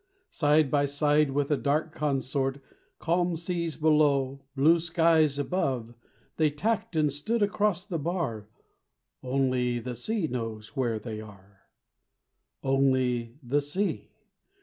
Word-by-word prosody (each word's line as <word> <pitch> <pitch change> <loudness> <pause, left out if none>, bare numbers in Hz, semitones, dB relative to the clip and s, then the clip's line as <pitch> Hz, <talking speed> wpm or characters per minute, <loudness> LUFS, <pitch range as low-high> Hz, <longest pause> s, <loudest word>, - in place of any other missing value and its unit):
Side 150 -3 +3
by 145 -1 +2
side 145 +1 +2
with 140 +2 -1
a - - +5
dark 155 +3 0
consort, 135 -1 -1 0.4
Calm 175 +1 0
seas 170 -1 -3
below, 145 -4 +2
blue 160 +5 +5
skies 165 -3 +3
above, 135 -7 -1 0.4
They 155 -1 +3
tacked 215 +6 -2
and 150 -3 +2
stood 210 +10 0
across 205 -2 0
the 170 -5 -3
bar: 140 - -3 0.7
Only 130 -2 0
the 125 +1 -5
sea 200 - -2
knows 115 -5 -4
where 120 -5 0
they 110 0 -6
are 100 -2 -16 1.0
Only 130 -3 +1
the 140 +4 +1
sea! 180 +9 -2
145 Hz, 125 wpm, -28 LUFS, 130-165 Hz, 1.0 s, a